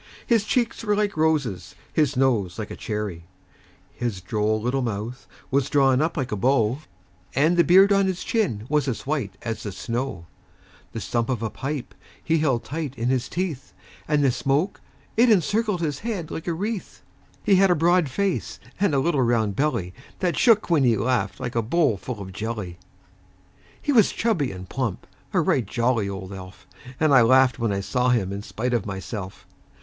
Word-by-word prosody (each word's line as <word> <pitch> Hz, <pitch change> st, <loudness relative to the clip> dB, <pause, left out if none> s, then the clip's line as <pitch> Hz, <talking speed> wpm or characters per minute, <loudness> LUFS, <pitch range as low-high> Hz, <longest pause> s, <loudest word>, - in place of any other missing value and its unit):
His 230 Hz, -4 st, +2 dB
cheeks 235 Hz, -1 st, 0 dB
were 210 Hz, -2 st, +1 dB
like 205 Hz, -1 st, 0 dB
roses, 145 Hz, -, 0 dB, 0.2 s
his 150 Hz, -4 st, +1 dB
nose 115 Hz, -9 st, +1 dB
like 110 Hz, -2 st, -5 dB
a -, -, -5 dB
cherry; 105 Hz, -6 st, -4 dB, 0.7 s
His 120 Hz, -6 st, -3 dB
droll 105 Hz, +3 st, 0 dB
little 125 Hz, +4 st, -1 dB
mouth 115 Hz, +2 st, -4 dB, 0.2 s
was 140 Hz, +1 st, +1 dB
drawn 135 Hz, -2 st, +4 dB
up 160 Hz, +2 st, -1 dB
like 130 Hz, -3 st, -2 dB
a -, -, 0 dB
bow, 120 Hz, +2 st, +2 dB, 0.6 s
And 155 Hz, +5 st, +3 dB
the 170 Hz, -, +5 dB
beard 190 Hz, +5 st, +6 dB
on 195 Hz, -1 st, +3 dB
his 185 Hz, -1 st, -2 dB
chin 170 Hz, -, -1 dB
was 150 Hz, -1 st, +1 dB
as 125 Hz, -, -3 dB
white 135 Hz, -10 st, -2 dB
as 115 Hz, -2 st, -3 dB
the 105 Hz, -, -5 dB
snow; 115 Hz, -3 st, -4 dB, 0.7 s
The 115 Hz, -, -4 dB
stump 115 Hz, 0 st, -1 dB
of 120 Hz, -3 st, -1 dB
a 110 Hz, -, -2 dB
pipe 140 Hz, -1 st, -5 dB, 0.3 s
he 165 Hz, -1 st, +2 dB
held 135 Hz, -6 st, +1 dB
tight 145 Hz, -2 st, -5 dB
in 120 Hz, +1 st, -1 dB
his 130 Hz, -2 st, 0 dB
teeth, 165 Hz, -, -4 dB, 0.3 s
And 150 Hz, -1 st, +2 dB
the 135 Hz, -, +4 dB
smoke, 140 Hz, +9 st, 0 dB, 0.3 s
it 235 Hz, +2 st, +5 dB
encircled 210 Hz, -1 st, +2 dB
his 150 Hz, -4 st, -2 dB
head 205 Hz, -8 st, -4 dB
like 160 Hz, -, -6 dB
a 170 Hz, -, +1 dB
wreath. 205 Hz, +4 st, -4 dB, 0.4 s
He 195 Hz, -, +4 dB
had 195 Hz, 0 st, +5 dB
a 180 Hz, -, +4 dB
broad 170 Hz, -1 st, +3 dB
face, 195 Hz, +6 st, -2 dB, 0.2 s
and 195 Hz, -7 st, +2 dB
a -, -, +3 dB
little 145 Hz, -1 st, +1 dB
round 115 Hz, -4 st, +1 dB
belly 100 Hz, -10 st, -1 dB, 0.2 s
That 180 Hz, -2 st, 0 dB
shook 225 Hz, -4 st, +4 dB
when 160 Hz, -5 st, +3 dB
he 120 Hz, -3 st, +3 dB
laughed, 125 Hz, +4 st, 0 dB
like 125 Hz, -2 st, -4 dB
a 115 Hz, -, +1 dB
bowl 140 Hz, +1 st, +2 dB
full 115 Hz, +3 st, -6 dB
of 95 Hz, -1 st, -8 dB
jelly. 105 Hz, -4 st, -5 dB, 1.0 s
He 290 Hz, -, -1 dB
was 225 Hz, -7 st, +5 dB
chubby 190 Hz, -, 0 dB
and 95 Hz, 0 st, -8 dB
plump 125 Hz, -1 st, -3 dB, 0.3 s
a -, -, +2 dB
right 130 Hz, -, +2 dB
jolly 115 Hz, -2 st, 0 dB
old 95 Hz, 0 st, -6 dB
elf; 95 Hz, -1 st, -11 dB, 0.3 s
And 155 Hz, -2 st, +3 dB
I 130 Hz, -, +8 dB
laughed 130 Hz, +2 st, +4 dB
when 115 Hz, -2 st, 0 dB
I 100 Hz, 0 st, -1 dB
saw 125 Hz, +5 st, 0 dB
him 100 Hz, -6 st, +1 dB
in 100 Hz, -, -4 dB
spite 120 Hz, +4 st, -3 dB
of 115 Hz, -4 st, 0 dB
myself. 95 Hz, 0 st, -6 dB
130 Hz, 190 wpm, -24 LUFS, 110-165 Hz, 1.0 s, I